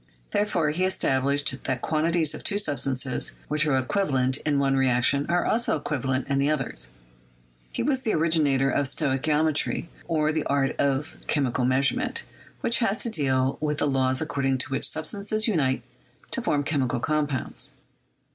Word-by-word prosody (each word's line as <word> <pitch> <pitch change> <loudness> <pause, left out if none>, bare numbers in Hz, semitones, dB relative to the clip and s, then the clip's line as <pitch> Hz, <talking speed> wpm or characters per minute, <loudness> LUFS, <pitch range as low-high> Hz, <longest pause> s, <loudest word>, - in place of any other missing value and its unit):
Therefore, 205 -7 +1
he 175 +5 -1
established 140 -5 0
that 130 -1 -1
quantities 160 0 +1
of - - -8
two 205 - +1
substances 135 -7 -1 0.2
which 150 +1 +2
are 135 -3 +3
equivalent 130 -3 +1
in 145 -1 0
one 135 -1 +2
reaction 135 +2 +2
are 175 0 +2
also 235 +2 +1
equivalent 135 -3 -2
in 140 -1 +1
others; 125 - -2 0.8
he - - -2
was 265 0 +1
the 225 - 0
originator 150 -5 +2
of 145 - +1
stoichiometry, 150 +4 0 0.2
or 155 -1 +1
"the 155 -1 -1
art 140 -1 +1
of 140 +2 0
chemical 130 -4 +1
measurement, 140 - +1 0.4
which 230 - +2
has 225 -3 +1
to 235 - -2
deal 135 -5 +1
with 150 -1 0
the - - +1
laws 130 -1 +1
according 135 -4 0
to 130 - -2
which 135 - +2
substances 205 +6 -1
unite 145 - +1 0.5
to - - -1
form 145 -1 +1
chemi 140 -3 0
cal - - -1
compounds." 145 -1 -1
145 Hz, 155 wpm, -26 LUFS, 135-160 Hz, 0.8 s, are